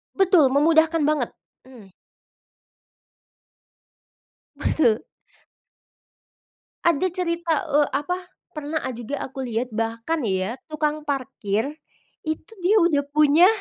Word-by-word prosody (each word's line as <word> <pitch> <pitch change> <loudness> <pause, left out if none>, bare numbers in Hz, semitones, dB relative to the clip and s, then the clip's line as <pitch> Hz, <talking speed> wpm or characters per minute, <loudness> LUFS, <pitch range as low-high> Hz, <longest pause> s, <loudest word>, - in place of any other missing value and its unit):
Betul, 365 -6 +5
memudahkan 315 +3 +3
banget! 295 -5 +1 0.4
Mmm. 220 -7 -15 2.7
Betul. 230 -8 +2 1.8
Ada 340 +1 +3
cerita, 335 -3 0 0.2
eee, 290 0 +4
apa, 295 +6 -1 0.3
pernah 305 +1 -3
a 260 - -2
juga 240 +4 -5
aku 265 0 -6
lihat, 240 +1 -2
bahkan 230 +7 -2
ya 190 +4 -1
tukang 305 0 -2
parkir 260 -2 -2 0.5
itu 315 +3 -4
dia 405 +5 +4
udah 300 -5 +3
punya 305 +4 +6
295 Hz, 95 wpm, -23 LUFS, 250-320 Hz, 2.7 s, punya